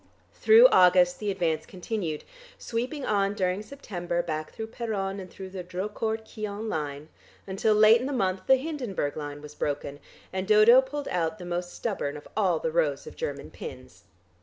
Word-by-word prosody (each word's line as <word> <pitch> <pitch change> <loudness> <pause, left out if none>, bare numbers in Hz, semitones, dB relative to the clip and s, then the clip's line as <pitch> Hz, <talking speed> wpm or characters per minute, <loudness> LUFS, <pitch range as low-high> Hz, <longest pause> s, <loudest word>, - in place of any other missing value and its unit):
Through 450 +3 +7
August 180 - +5
the 210 - -2
advance 165 -5 -1
continued, 180 -4 -4 0.3
sweeping 255 +5 -3
on 200 -1 +1
during 185 0 0
September 180 -8 -4
back 155 -1 -4
through 220 0 -6
Peronne, 200 -5 -3
and 185 -1 -8
through 190 +1 -9
the 185 -1 -6
Drocourt 210 +5 -3
Quéant 215 0 -5
line, 150 -4 -4 0.4
until 200 +3 +1
late 215 +2 +7
in 255 - -2
the - - -3
month 190 -7 -1
the 265 - +7
Hindenburg 255 - -3
line 145 -1 -6
was 150 0 -10
broken, 145 -1 -3 0.3
and 190 0 -2
Dodo 215 +4 +7
pulled 285 +2 -5
out 170 +2 -1
the 180 - -9
most 175 0 -4
stubborn 150 -10 -3
of 145 - -12
all 195 -4 +2
the - - -2
rows - - 0
of 465 - -10
German 480 - -5
pins. 470 - -10
195 Hz, 175 wpm, -27 LUFS, 175-225 Hz, 0.4 s, Through